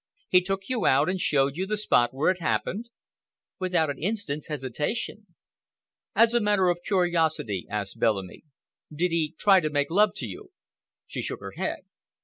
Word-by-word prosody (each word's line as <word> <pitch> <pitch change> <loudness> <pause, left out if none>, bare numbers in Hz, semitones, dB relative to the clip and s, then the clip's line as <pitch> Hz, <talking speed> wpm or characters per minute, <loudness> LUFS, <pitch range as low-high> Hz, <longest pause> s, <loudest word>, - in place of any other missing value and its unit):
"He 180 - +6
took 195 +1 -3
you 250 -6 0
out 140 +5 +4
and 185 -1 -1
showed 140 -3 +2
you 190 +3 -2
the 215 +1 -1
spot 120 - +3
where 140 +7 +2
it 185 - -5
happened?" 210 +6 -2 0.7
"Without 180 -5 +1
an 140 - -9
instant's 175 -6 -2
hesitation." 150 - -3 0.9
"As 230 0 +5
a 240 - +3
matter 205 -3 +3
of 175 0 -1
curiosity," 165 - 0
asked 100 -2 -4
Bellamy, 95 -5 0 0.5
"did 170 +4 0
he 165 -1 -1
try 195 -2 +5
to 155 -3 -1
make 145 +1 0
love 205 +3 +3
to - - -3
you?" 385 0 -10 0.5
She - - -5
shook - - -5
her - - -7
head. - - -3
175 Hz, 170 wpm, -26 LUFS, 145-205 Hz, 0.9 s, He